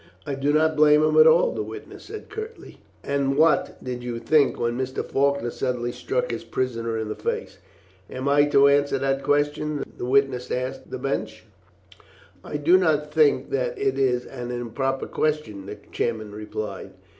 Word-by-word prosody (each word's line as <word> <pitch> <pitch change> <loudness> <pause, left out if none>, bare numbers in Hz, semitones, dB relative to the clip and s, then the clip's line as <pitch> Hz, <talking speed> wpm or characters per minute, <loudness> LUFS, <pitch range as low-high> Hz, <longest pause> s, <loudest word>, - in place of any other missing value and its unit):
"I 145 - -3
did 140 +2 +1
not 160 0 +3
blame 150 0 +5
him 155 0 +2
at 155 0 +8
all," 160 +2 +5
the 110 - -3
witness 110 +1 -9
said 435 +1 -8
curtly. 440 +1 -8 0.2
"And 140 -1 0
what 160 +1 +3
did 125 -1 -4
you 120 -1 -4
think 145 +5 +2
when 120 0 0
Mr. 130 +1 -3
Faulkner 140 -3 0
suddenly 120 -1 -2
struck - - -2
his - - -4
prisoner 115 -3 -2
in 110 -1 -3
the 105 - -3
face?" - - -4 0.5
"Am 130 +2 -4
I 145 +1 +5
to 140 -1 +5
answer 140 0 +3
that 135 0 0
question?" 145 +1 0 0.2
the - - -3
witness 130 -1 +1
asked 130 +1 -4
the - - -4
bench. - - -3 1.0
"I 150 - -4
do 165 +5 +5
not 150 -4 +1
think 155 -2 +3
that - - -1
it 405 0 0
is 125 -2 +1
an 125 -2 -7
improper 125 +3 -2
question," 150 -11 -2
the 105 +1 -7
chairman 110 -3 -2
replied. 105 0 -6
140 Hz, 175 wpm, -24 LUFS, 120-150 Hz, 1.0 s, at